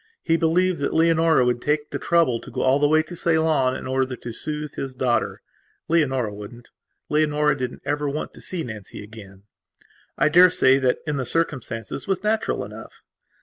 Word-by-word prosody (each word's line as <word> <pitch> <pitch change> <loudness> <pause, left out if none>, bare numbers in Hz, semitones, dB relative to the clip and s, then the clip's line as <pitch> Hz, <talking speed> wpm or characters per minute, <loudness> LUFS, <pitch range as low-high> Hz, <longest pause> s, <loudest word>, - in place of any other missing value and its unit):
He 165 - +2
believed 170 +2 +2
that - - -2
Leonora 165 -4 +4
would 120 -1 0
take 150 +1 -1
the - - -3
trouble 165 -9 +2
to - - -11
go - - -4
all 130 +2 +3
the 145 - +4
way 155 +1 +3
to 175 +3 -9
Ceylon 160 -6 +2
in - - -7
order 130 0 -1
to 120 -1 -8
soothe 150 +4 -5
his 135 -1 -5
daughter. 125 -2 -1 0.4
Leonora 135 -9 +1
wouldn't. 105 +4 -11 0.4
Leonora 150 0 +2
didn't 125 -2 -5
ever 145 0 -1
want 150 +2 -4
to - - -12
see 180 -3 -3
Nancy 110 -3 -8
again. 100 -3 -13 0.7
I - - +3
daresay 160 -5 +5
that 130 -2 0
that, - - -26
in 150 -1 -1
the 135 - -1
circumstances, 125 - -3
was 195 0 -1
natural 215 +1 0
enough. - - -12
145 Hz, 185 wpm, -23 LUFS, 125-160 Hz, 0.7 s, daresay